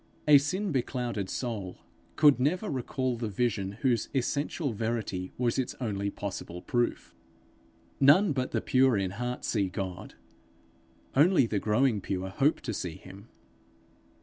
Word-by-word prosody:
A 145 Hz, -1 st, +9 dB
sin 185 Hz, +8 st, -2 dB
beclouded 120 Hz, -6 st, -2 dB
soul 105 Hz, -7 st, -4 dB, 0.4 s
could 145 Hz, -4 st, +5 dB
never 165 Hz, +9 st, 0 dB
recall 130 Hz, -1 st, -2 dB
the 115 Hz, -1 st, -3 dB
vision 100 Hz, -2 st, -1 dB
whose 120 Hz, -5 st, +1 dB
essential 140 Hz, +2 st, -1 dB
verity 110 Hz, -4 st, -3 dB
was 120 Hz, 0 st, 0 dB
its 130 Hz, -, -2 dB
only 100 Hz, -5 st, -2 dB
possible 95 Hz, -3 st, -6 dB
proof. 120 Hz, -1 st, -1 dB, 0.9 s
None 150 Hz, +6 st, +6 dB
but 130 Hz, -1 st, -1 dB
the -, -, -1 dB
pure 130 Hz, -3 st, +3 dB
in 95 Hz, -2 st, -1 dB
heart 125 Hz, +5 st, -4 dB
see 100 Hz, -4 st, 0 dB
God; 90 Hz, -1 st, -6 dB, 1.0 s
only 155 Hz, 0 st, +5 dB
the 110 Hz, -3 st, -1 dB
growing 110 Hz, +1 st, +2 dB
pure 95 Hz, 0 st, -3 dB
hope 140 Hz, +10 st, +1 dB
to 115 Hz, -, -4 dB
see 90 Hz, -5 st, -4 dB
him. 95 Hz, +3 st, -13 dB
120 Hz, 140 wpm, -29 LUFS, 100-135 Hz, 1.0 s, A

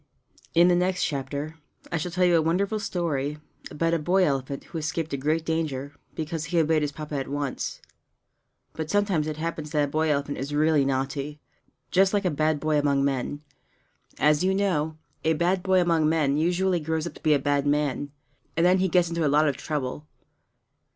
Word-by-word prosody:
In 170 Hz, +1 st, +7 dB
the 180 Hz, -, +4 dB
next 180 Hz, +1 st, +1 dB
chapter 145 Hz, +2 st, -4 dB, 0.3 s
I 170 Hz, -, 0 dB
shall 165 Hz, +3 st, -3 dB
tell 180 Hz, +1 st, +2 dB
you 175 Hz, -1 st, +4 dB
a 165 Hz, -, +4 dB
wonderful 195 Hz, +7 st, 0 dB
story 150 Hz, -7 st, -2 dB, 0.3 s
about 165 Hz, +2 st, 0 dB
a 170 Hz, -, +2 dB
boy 180 Hz, +5 st, +2 dB
elephant 135 Hz, -1 st, -2 dB
who 165 Hz, -, -6 dB
escaped 160 Hz, 0 st, -3 dB
a -, -, +2 dB
great 155 Hz, +4 st, 0 dB
danger 145 Hz, -4 st, -2 dB, 0.2 s
because 160 Hz, 0 st, -3 dB
he 170 Hz, +2 st, -2 dB
obeyed 160 Hz, -1 st, +3 dB
his 145 Hz, -1 st, -1 dB
Papa 150 Hz, +1 st, -8 dB
at 135 Hz, -, -3 dB
once. 140 Hz, -1 st, -4 dB, 0.9 s
But 160 Hz, -1 st, -5 dB
sometimes 200 Hz, -7 st, +1 dB
it 155 Hz, -1 st, -4 dB
happens 160 Hz, -1 st, -4 dB
that 150 Hz, -1 st, +3 dB
a -, -, +1 dB
boy 155 Hz, +2 st, 0 dB
elephant 145 Hz, -1 st, -1 dB
is 140 Hz, +3 st, -3 dB
really 150 Hz, -2 st, +3 dB
naughty 135 Hz, +2 st, -2 dB, 0.5 s
just 195 Hz, +2 st, +4 dB
like 200 Hz, -1 st, 0 dB
a 180 Hz, -, +2 dB
bad 155 Hz, 0 st, +1 dB
boy 155 Hz, 0 st, +1 dB
among 140 Hz, -1 st, +2 dB
men. 140 Hz, +2 st, -2 dB, 0.7 s
As 150 Hz, +3 st, +3 dB
you 190 Hz, +1 st, +2 dB
know, 160 Hz, -6 st, 0 dB, 0.3 s
a 160 Hz, -, +3 dB
bad 175 Hz, +4 st, +1 dB
boy 190 Hz, 0 st, +3 dB
among 165 Hz, -3 st, +3 dB
men 150 Hz, -3 st, +2 dB
usually 180 Hz, +3 st, +1 dB
grows 160 Hz, 0 st, -2 dB
up 170 Hz, -, -5 dB
to -, -, -15 dB
be 155 Hz, -2 st, +4 dB
a -, -, +4 dB
bad 145 Hz, +1 st, 0 dB
man, 145 Hz, -1 st, 0 dB, 0.5 s
and 165 Hz, -, +4 dB
then 185 Hz, +1 st, +5 dB
he 190 Hz, 0 st, +2 dB
gets 175 Hz, -1 st, +3 dB
into 170 Hz, -1 st, -1 dB
a 150 Hz, -, +3 dB
lot 150 Hz, +2 st, +4 dB
of 140 Hz, -, +1 dB
trouble. 145 Hz, 0 st, -4 dB
155 Hz, 200 wpm, -26 LUFS, 145-170 Hz, 0.9 s, In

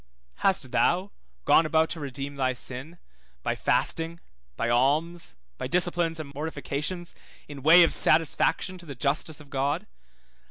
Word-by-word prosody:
Hast 165 Hz, -10 st, +1 dB
thou 185 Hz, +3 st, +1 dB, 0.3 s
gone -, -, +6 dB
about 160 Hz, 0 st, +2 dB
to 165 Hz, -, -4 dB
redeem 140 Hz, 0 st, -5 dB
thy 130 Hz, -2 st, 0 dB
sin, 130 Hz, +7 st, -4 dB, 0.5 s
by -, -, 0 dB
fasting, 165 Hz, +1 st, 0 dB, 0.4 s
by 115 Hz, -, -1 dB
alms, 150 Hz, +8 st, +1 dB, 0.2 s
by -, -, -3 dB
disciplines 175 Hz, -2 st, +1 dB
and 140 Hz, -2 st, -7 dB
mortifications, 150 Hz, +3 st, -4 dB, 0.3 s
in 145 Hz, -2 st, -9 dB
way 165 Hz, +5 st, +8 dB
of 165 Hz, -, +2 dB
satisfaction 165 Hz, +3 st, +2 dB
to 170 Hz, -, -14 dB
the 140 Hz, -, -7 dB
justice 145 Hz, +4 st, 0 dB
of 145 Hz, -2 st, -15 dB
God? 145 Hz, +8 st, -1 dB
155 Hz, 145 wpm, -26 LUFS, 140-170 Hz, 0.5 s, way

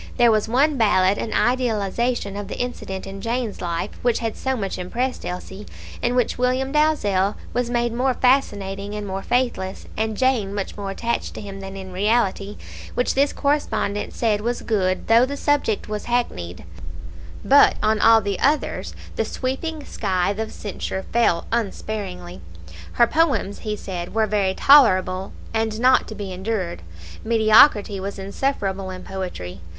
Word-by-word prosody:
There 240 Hz, -2 st, +6 dB
was 215 Hz, -1 st, +1 dB
one 280 Hz, +5 st, +3 dB
ballad 200 Hz, -3 st, +3 dB
an 220 Hz, -, -3 dB
idealization 235 Hz, -3 st, 0 dB
of 205 Hz, -1 st, -5 dB
the -, -, -6 dB
incident 220 Hz, -6 st, -4 dB
in 195 Hz, 0 st, -8 dB
Jane's 230 Hz, -1 st, -2 dB
life 175 Hz, +3 st, -2 dB
which 240 Hz, -1 st, +2 dB
had 225 Hz, -2 st, -3 dB
so 265 Hz, -1 st, -2 dB
much 195 Hz, -4 st, -3 dB
impressed 245 Hz, +8 st, -2 dB
Elsie, 190 Hz, +3 st, -6 dB, 0.3 s
in 240 Hz, +1 st, 0 dB
which 245 Hz, -1 st, 0 dB
William 255 Hz, +2 st, +1 dB
Dalzell 210 Hz, -11 st, +2 dB, 0.2 s
was 245 Hz, -1 st, 0 dB
made 240 Hz, -1 st, 0 dB
more 255 Hz, +2 st, +1 dB
fascinating 205 Hz, -6 st, +1 dB
and 210 Hz, -1 st, -4 dB
more 195 Hz, 0 st, -4 dB
faithless, 240 Hz, -7 st, -1 dB
and 220 Hz, -1 st, -2 dB
Jane 240 Hz, -7 st, +1 dB
much 200 Hz, -2 st, -4 dB
more 200 Hz, -1 st, -5 dB
attached 235 Hz, +4 st, -3 dB
to -, -, -6 dB
him 200 Hz, -1 st, -8 dB
than 195 Hz, 0 st, -7 dB
in 190 Hz, -1 st, -8 dB
reality 205 Hz, 0 st, 0 dB, 0.4 s
which 245 Hz, -, +1 dB
this 280 Hz, +1 st, +2 dB
correspondent 280 Hz, -8 st, -1 dB
said 215 Hz, -3 st, +1 dB
was 240 Hz, +2 st, -2 dB
good, 185 Hz, -4 st, 0 dB
though 230 Hz, +2 st, +5 dB
the 280 Hz, +2 st, -2 dB
subject 285 Hz, -8 st, 0 dB
was 210 Hz, -1 st, -4 dB
hackneyed, 90 Hz, -, -2 dB, 0.8 s
but 280 Hz, +1 st, +6 dB
on 215 Hz, 0 st, +2 dB
all 225 Hz, 0 st, +6 dB
the 200 Hz, -2 st, -2 dB
others 295 Hz, +2 st, 0 dB, 0.2 s
the -, -, +2 dB
sweeping 290 Hz, +4 st, -4 dB
scythe 195 Hz, 0 st, -1 dB
of 220 Hz, 0 st, -3 dB
censure 190 Hz, -2 st, -5 dB
fell 225 Hz, -8 st, +2 dB
unsparingly. 195 Hz, -, -4 dB, 0.5 s
"Her 235 Hz, -, +5 dB
poems," 275 Hz, -8 st, +1 dB
he 215 Hz, -1 st, -3 dB
said, 180 Hz, -2 st, -6 dB
"were 220 Hz, -1 st, +3 dB
very 200 Hz, -3 st, 0 dB
tolerable, 190 Hz, -9 st, +5 dB, 0.2 s
and 220 Hz, -1 st, -1 dB
not 255 Hz, +1 st, +4 dB
to 220 Hz, -, -7 dB
be 200 Hz, -3 st, -5 dB
endured;" 190 Hz, -, -3 dB, 0.4 s
mediocrity 220 Hz, -2 st, +5 dB
was 200 Hz, +2 st, -5 dB
insufferable 195 Hz, -2 st, -2 dB
in 185 Hz, 0 st, -7 dB
poetry. 95 Hz, -, -6 dB
215 Hz, 160 wpm, -22 LUFS, 195-245 Hz, 0.8 s, There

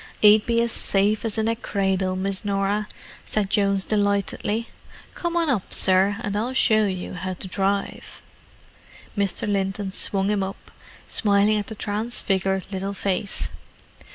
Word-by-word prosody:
"'E'd 210 Hz, 0 st, +7 dB
be 230 Hz, -1 st, +2 dB
as 235 Hz, 0 st, 0 dB
safe 205 Hz, +1 st, +1 dB
as 225 Hz, -2 st, -1 dB
in 220 Hz, 0 st, +1 dB
a 230 Hz, -, +1 dB
cradle, 190 Hz, -4 st, -1 dB
Miss 190 Hz, +1 st, -3 dB
Norah," 200 Hz, +1 st, 0 dB, 0.4 s
said 205 Hz, -2 st, -1 dB
Jones 200 Hz, -2 st, +2 dB
delightedly. 205 Hz, +2 st, 0 dB, 0.5 s
"Come 345 Hz, 0 st, -2 dB
on 335 Hz, -1 st, +2 dB
up, 245 Hz, -10 st, -1 dB
sir, 190 Hz, +2 st, +3 dB
and 205 Hz, -1 st, -2 dB
I'll 230 Hz, +5 st, -1 dB
show 215 Hz, -4 st, +4 dB
you 185 Hz, -1 st, -5 dB
'ow 185 Hz, 0 st, -2 dB
to 185 Hz, -, -6 dB
drive." 195 Hz, +1 st, -2 dB, 1.0 s
Mr. 200 Hz, -1 st, 0 dB
Linton 195 Hz, -1 st, -1 dB
swung 195 Hz, +1 st, 0 dB
him 205 Hz, -2 st, +1 dB
up, 190 Hz, +1 st, -6 dB, 0.4 s
smiling 205 Hz, 0 st, +3 dB
at 205 Hz, -, -3 dB
the 220 Hz, -, -6 dB
transfigured 195 Hz, -3 st, -1 dB
little 195 Hz, +1 st, -3 dB
face. 195 Hz, +1 st, 0 dB
200 Hz, 150 wpm, -24 LUFS, 195-215 Hz, 1.0 s, E'd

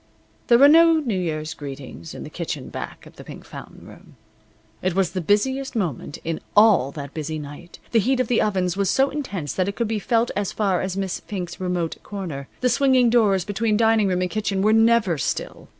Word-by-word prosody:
There 235 Hz, -, +6 dB
were 275 Hz, +3 st, +8 dB
no 330 Hz, +2 st, +7 dB
New 285 Hz, -10 st, 0 dB
Year's 155 Hz, -2 st, -3 dB
greetings 135 Hz, -, -9 dB
in -, -, -7 dB
the -, -, -9 dB
kitchen -, -, -5 dB
back -, -, -7 dB
of -, -, -16 dB
the -, -, -10 dB
Pink -, -, -11 dB
Fountain -, -, -11 dB
Room. -, -, -15 dB, 0.7 s
It 185 Hz, -1 st, -1 dB
was 190 Hz, -3 st, +1 dB
the 185 Hz, -, -3 dB
busiest 260 Hz, -, 0 dB
moment 160 Hz, -, -3 dB
in 165 Hz, -1 st, -3 dB, 0.2 s
all 205 Hz, -, +6 dB
that 140 Hz, -2 st, -7 dB
busy 155 Hz, 0 st, -4 dB
night. 150 Hz, +3 st, -10 dB
The 230 Hz, -, +4 dB
heat 255 Hz, +5 st, +1 dB
of 255 Hz, -, +1 dB
the 240 Hz, -, +2 dB
ovens 185 Hz, -4 st, 0 dB
was 200 Hz, -1 st, 0 dB
so 270 Hz, +1 st, +2 dB
intense 200 Hz, -, -4 dB
that 185 Hz, 0 st, 0 dB
it 200 Hz, -, -3 dB
could 235 Hz, -, -1 dB
be 220 Hz, -1 st, -1 dB
felt 230 Hz, +2 st, +1 dB
as 200 Hz, -1 st, -1 dB
far 195 Hz, -4 st, 0 dB
as 190 Hz, 0 st, -3 dB
Miss 195 Hz, -2 st, -2 dB
Fink's 180 Hz, -4 st, -6 dB
remote 180 Hz, -3 st, -2 dB
corner. 170 Hz, -9 st, -6 dB
The 250 Hz, -, +3 dB
swinging 255 Hz, -1 st, +3 dB
doors 205 Hz, -6 st, +3 dB
between 210 Hz, +1 st, 0 dB
dining 225 Hz, -2 st, +3 dB
room 180 Hz, -1 st, 0 dB
and 180 Hz, -, -3 dB
kitchen 205 Hz, -3 st, -1 dB
were 215 Hz, +1 st, +4 dB
never 225 Hz, -7 st, +3 dB
still. -, -, -4 dB
200 Hz, 215 wpm, -23 LUFS, 175-230 Hz, 0.7 s, were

